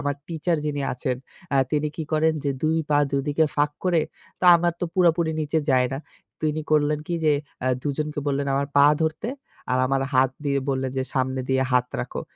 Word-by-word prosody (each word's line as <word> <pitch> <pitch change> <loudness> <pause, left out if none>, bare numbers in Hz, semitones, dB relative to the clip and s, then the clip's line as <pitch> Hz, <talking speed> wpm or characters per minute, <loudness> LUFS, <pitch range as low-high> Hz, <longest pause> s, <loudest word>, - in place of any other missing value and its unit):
আমার 145 0 -1
টিচার 165 +1 -1
যিনি 145 -1 -2
আছেন 125 0 -2 0.4
আ - - +4 0.2
তিনি 150 0 +1
কি 160 - -3
করেন 155 +1 +3
যে 140 - +1
২ 160 +1 +2
পা 145 - +4
দুদিকে 145 +3 +1
ফাঁক 145 0 +2
করে 175 -3 +3 0.4
তো - - -2
আমার 170 0 +1
তো - - 0
পুরাপুরি 170 -2 +3
নিচে 155 +1 0
যায় 130 -1 +4
না। 135 - -2 0.4
তো - - -61
তিনি 155 +1 -2
করলেন 150 0 +3
কি 175 - -2
যে 155 - +5 0.3
আ - - 0 0.2
দুজনকে 150 +1 -3
বললেন 140 0 0
আমার 140 +1 0
পা 140 0 +8 0.2
ধরতে 160 +7 -1 0.4
আর 130 - +2
আমার 135 +1 +1
হাত 130 0 +4
দিয়ে 140 -1 +1
বললেন 130 -1 -1
যে - - +1
সামনে 130 0 0
দিয়ে 130 0 +2
হাত 125 0 +3
রাখো। - - -5
145 Hz, 205 wpm, -24 LUFS, 135-160 Hz, 0.4 s, পা